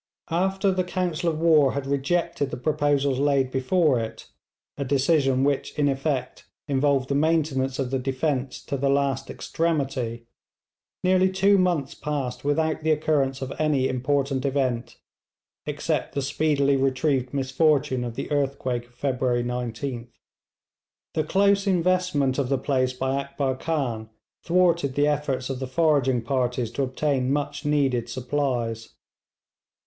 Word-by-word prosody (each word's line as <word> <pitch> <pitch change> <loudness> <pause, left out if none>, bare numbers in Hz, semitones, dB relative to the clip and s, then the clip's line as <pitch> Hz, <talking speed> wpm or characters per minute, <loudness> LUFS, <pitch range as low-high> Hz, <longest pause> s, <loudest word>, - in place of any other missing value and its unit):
After 190 +3 +1
the 185 0 0
council 180 -2 -1
of 155 -1 -3
war 155 -5 +4
had 140 -1 -3
rejected 140 +2 0
the - - -5
proposals 145 -1 +1
laid 140 -2 +2
before 135 +1 +2
it, 110 -1 -6 0.5
a 140 - -3
decision 135 -1 +2
which 140 +1 -1
in 145 -1 +2
effect 135 -1 -2 0.2
involved 140 -1 +1
the 140 - -1
maintenance 140 -3 +1
of 135 -3 -2
the 135 - 0
defence 135 +1 -2
to 140 - -3
the 140 +1 0
last 140 -1 0
extremity, 135 -8 -2 0.8
nearly 185 +1 +4
two 195 +1 +3
months 170 -7 +1
passed 140 -4 -4
without 155 +2 0
the 160 - -1
occurrence 145 -4 +1
of 130 - -5
any 150 -4 +2
important 135 +1 0
event, 130 -4 -1 0.7
except - - -2
the 140 - 0
speedily 140 0 +1
retrieved 135 -1 +1
misfortune 140 -1 +1
of 120 -1 -5
the - - -5
earthquake 130 -4 -1
of 120 - -28
February 125 -2 0
19th. 120 0 -4 1.1
The 160 -2 +1
close 200 +4 +2
investment 180 -7 +1
of 130 -3 -1
the 135 - +2
place 130 -1 0
by 130 +1 -1
Akbar 140 -1 -2
Khan 130 -8 -2 0.3
thwarted 170 -6 +2
the 145 - +3
efforts 140 -3 -1
of 130 - -4
the 130 - -4
foraging 135 -4 +2
parties 125 -2 -1
to 120 - -3
obtain 135 0 0
much 145 +1 -2
needed 135 -5 +1
supplies. 125 -3 -2
140 Hz, 140 wpm, -25 LUFS, 130-155 Hz, 1.1 s, war